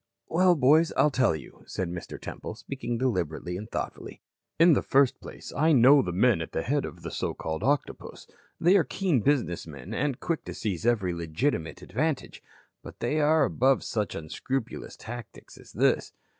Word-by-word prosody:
"Well, 180 Hz, +1 st, +4 dB
boys, 155 Hz, +4 st, +4 dB
I'll 150 Hz, -, +4 dB
tell 130 Hz, -, +2 dB
you," 75 Hz, -, -11 dB
said 95 Hz, -, -3 dB
Mr. 85 Hz, 0 st, -7 dB
Temple, -, -, -7 dB
speaking 120 Hz, -3 st, -5 dB
deliberately 90 Hz, -, -2 dB
and 105 Hz, +4 st, -7 dB
thoughtfully. -, -, -6 dB, 0.3 s
"In 165 Hz, +1 st, +7 dB
the -, -, +2 dB
first 135 Hz, -1 st, +3 dB
place -, -, -10 dB
I 155 Hz, +2 st, +3 dB
know 135 Hz, +2 st, +7 dB
the 90 Hz, -, -3 dB
men 100 Hz, +1 st, +3 dB
at 80 Hz, -, -6 dB
the 80 Hz, -, -1 dB
head 145 Hz, +2 st, 0 dB
of -, -, -9 dB
the -, -, -5 dB
so -, -, -3 dB
called 80 Hz, 0 st, -4 dB
Octopus. 145 Hz, +1 st, -2 dB, 0.3 s
They 180 Hz, +4 st, +5 dB
are 180 Hz, -, +4 dB
keen 180 Hz, -8 st, 0 dB
business 120 Hz, -, 0 dB
men 70 Hz, -5 st, -9 dB
and 140 Hz, -2 st, -1 dB
quick 165 Hz, -2 st, -2 dB
to -, -, -7 dB
seize 105 Hz, -1 st, -2 dB
every 100 Hz, -7 st, +2 dB
legitimate 85 Hz, -, -2 dB
advantage. 155 Hz, 0 st, -2 dB, 0.4 s
But -, -, -12 dB
they 155 Hz, -, 0 dB
are 155 Hz, +1 st, +4 dB
above 135 Hz, +1 st, +2 dB
such 105 Hz, -3 st, -2 dB
unscrupulous 115 Hz, -, -4 dB
tactics 120 Hz, +1 st, -10 dB
as -, -, -15 dB
this. -, -, +1 dB
130 Hz, 180 wpm, -27 LUFS, 90-145 Hz, 0.4 s, In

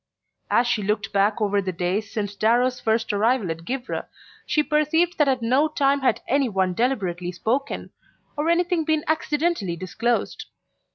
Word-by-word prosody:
As 245 Hz, -, +3 dB
she 235 Hz, -3 st, 0 dB
looked 210 Hz, 0 st, -2 dB
back 205 Hz, +2 st, +2 dB
over 205 Hz, -1 st, +1 dB
the 190 Hz, -1 st, -3 dB
days 185 Hz, +4 st, -2 dB
since 205 Hz, -2 st, -3 dB
Darrow's 245 Hz, +4 st, +2 dB
first 225 Hz, -2 st, 0 dB
arrival 215 Hz, -2 st, +1 dB
at 165 Hz, +1 st, -7 dB
Givre 260 Hz, +3 st, -4 dB, 0.4 s
she 300 Hz, -, +2 dB
perceived 320 Hz, +4 st, +1 dB
that 300 Hz, -, +4 dB
at 260 Hz, -3 st, +1 dB
no 260 Hz, +6 st, +3 dB
time 280 Hz, -2 st, +1 dB
had 265 Hz, -, +1 dB
any 275 Hz, -1 st, +2 dB
one 190 Hz, -3 st, 0 dB
deliberately 180 Hz, -7 st, -1 dB
spoken, 240 Hz, +10 st, -2 dB, 0.4 s
or 300 Hz, +2 st, -1 dB
anything 345 Hz, 0 st, +2 dB
been 310 Hz, -1 st, 0 dB
accidentally 310 Hz, -, 0 dB
disclosed. 225 Hz, +7 st, -2 dB
240 Hz, 160 wpm, -23 LUFS, 200-295 Hz, 0.4 s, that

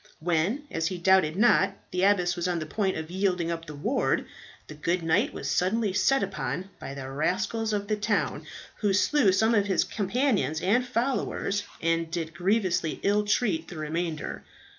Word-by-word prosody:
When, 175 Hz, -, 0 dB
as 165 Hz, 0 st, -1 dB
he 185 Hz, 0 st, -3 dB
doubted 175 Hz, -3 st, +3 dB
not, 230 Hz, +5 st, +4 dB, 0.2 s
the 180 Hz, -, -1 dB
abbess 180 Hz, -3 st, +3 dB
was 175 Hz, 0 st, -2 dB
on 175 Hz, -1 st, 0 dB
the 155 Hz, -, -3 dB
point 190 Hz, +3 st, -1 dB
of 160 Hz, +1 st, -6 dB
yielding 180 Hz, -3 st, 0 dB
up 165 Hz, 0 st, -4 dB
the 150 Hz, -, -7 dB
ward, 145 Hz, -, 0 dB, 0.4 s
the -, -, -10 dB
good 170 Hz, +4 st, -1 dB
knight 160 Hz, 0 st, +2 dB
was 140 Hz, -, -6 dB
suddenly 190 Hz, +7 st, +1 dB
set 270 Hz, +5 st, +3 dB
upon 195 Hz, 0 st, -4 dB
by 135 Hz, -, -7 dB
the 135 Hz, -1 st, -6 dB
rascals 210 Hz, +10 st, -1 dB
of 205 Hz, -1 st, -2 dB
the 215 Hz, -, +1 dB
town, 210 Hz, -, -1 dB, 0.3 s
who 205 Hz, -2 st, +1 dB
slew 215 Hz, +2 st, +3 dB
some 220 Hz, +5 st, +3 dB
of 205 Hz, -2 st, +2 dB
his 190 Hz, -3 st, +2 dB
companions 205 Hz, -, 0 dB
and 215 Hz, +9 st, +2 dB
followers, 240 Hz, -4 st, -1 dB, 0.2 s
and 165 Hz, 0 st, +1 dB
did 165 Hz, -1 st, -4 dB
grievously 180 Hz, -2 st, 0 dB
ill 205 Hz, +1 st, +2 dB
treat 200 Hz, -6 st, +1 dB
the 175 Hz, -, -9 dB
remainder. 155 Hz, +1 st, -3 dB
185 Hz, 180 wpm, -27 LUFS, 165-210 Hz, 0.4 s, not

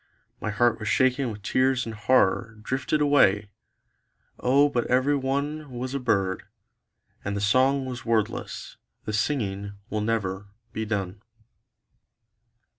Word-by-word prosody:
My -, -, -3 dB
heart 120 Hz, +3 st, +2 dB
was 110 Hz, -, -5 dB
shaken 130 Hz, +4 st, +2 dB
with 105 Hz, -1 st, -10 dB
tears 130 Hz, +3 st, +2 dB
and 115 Hz, -, -5 dB
horror 110 Hz, 0 st, +2 dB
Drifted 135 Hz, +5 st, -1 dB
away... 105 Hz, -9 st, +4 dB, 0.9 s
O 140 Hz, +3 st, +4 dB
but 125 Hz, -4 st, -1 dB
every 130 Hz, +3 st, +3 dB
one 140 Hz, +3 st, -2 dB
Was 125 Hz, +1 st, -5 dB
a 140 Hz, -, -1 dB
bird; 95 Hz, -7 st, 0 dB, 0.8 s
and 100 Hz, 0 st, -2 dB
the -, -, -1 dB
song 130 Hz, +7 st, +3 dB
was 125 Hz, -2 st, -6 dB
wordless; 115 Hz, -3 st, -2 dB, 0.3 s
the 110 Hz, -, -3 dB
singing 100 Hz, -4 st, -1 dB, 0.2 s
will 105 Hz, -, -1 dB
never 100 Hz, -3 st, -2 dB, 0.3 s
be 110 Hz, -, -2 dB
done. 100 Hz, -2 st, -3 dB
120 Hz, 130 wpm, -26 LUFS, 105-130 Hz, 0.9 s, away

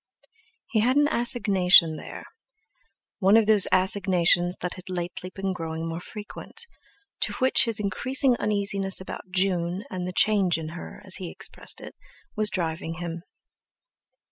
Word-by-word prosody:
He 225 Hz, -, +2 dB
had 250 Hz, +4 st, +2 dB
an 290 Hz, 0 st, +4 dB
assignation 190 Hz, -, +4 dB
there, -, -, -9 dB, 0.9 s
one 200 Hz, +2 st, +5 dB
of 225 Hz, -, +4 dB
those 210 Hz, -2 st, +6 dB
assignations 180 Hz, -2 st, +3 dB
that 180 Hz, -, -3 dB
had 185 Hz, 0 st, -12 dB
lately 180 Hz, 0 st, -5 dB
been 195 Hz, 0 st, -4 dB
growing 165 Hz, -1 st, -5 dB
more 165 Hz, +1 st, -4 dB
frequent, 210 Hz, -, -8 dB, 0.5 s
to -, -, -1 dB
which 260 Hz, 0 st, +3 dB
his 230 Hz, -2 st, -1 dB
increasing 250 Hz, +6 st, +1 dB
uneasiness 200 Hz, -2 st, 0 dB
about 190 Hz, 0 st, -9 dB
June 185 Hz, 0 st, -1 dB
and 180 Hz, -1 st, -4 dB
the 180 Hz, -, -5 dB
"change 195 Hz, -4 st, +3 dB
in 160 Hz, -1 st, -6 dB
her," 175 Hz, +4 st, -10 dB
as 190 Hz, -, +4 dB
he 180 Hz, -3 st, -6 dB
expressed -, -, -6 dB
it, -, -, -10 dB, 0.4 s
was 215 Hz, -1 st, +1 dB
driving 165 Hz, -3 st, -3 dB
him. 170 Hz, 0 st, -6 dB
185 Hz, 145 wpm, -25 LUFS, 175-210 Hz, 0.9 s, those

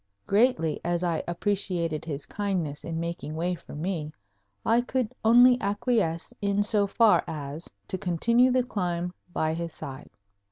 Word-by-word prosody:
Greatly 200 Hz, -7 st, +2 dB
as 175 Hz, 0 st, -1 dB
I 170 Hz, -2 st, 0 dB
appreciated 175 Hz, -4 st, -1 dB
his 145 Hz, -3 st, -4 dB
kindness 185 Hz, -8 st, -3 dB
in 165 Hz, -1 st, -4 dB
making 170 Hz, -2 st, -4 dB
way 175 Hz, +3 st, 0 dB
for 170 Hz, -, -10 dB
me, 155 Hz, -1 st, -3 dB, 0.5 s
I 230 Hz, +2 st, +4 dB
could 250 Hz, -1 st, -2 dB
only 245 Hz, +2 st, +6 dB
acquiesce 200 Hz, -5 st, 0 dB
in 200 Hz, 0 st, +1 dB
so 205 Hz, -1 st, +3 dB
far 225 Hz, +2 st, +4 dB
as 150 Hz, +1 st, -6 dB, 0.2 s
to 185 Hz, -, -3 dB
continue 230 Hz, +9 st, +3 dB
the 255 Hz, 0 st, +2 dB
climb 180 Hz, -6 st, -2 dB, 0.2 s
by 160 Hz, -2 st, 0 dB
his 165 Hz, 0 st, -4 dB
side. 140 Hz, -2 st, -8 dB
180 Hz, 150 wpm, -27 LUFS, 165-215 Hz, 0.5 s, only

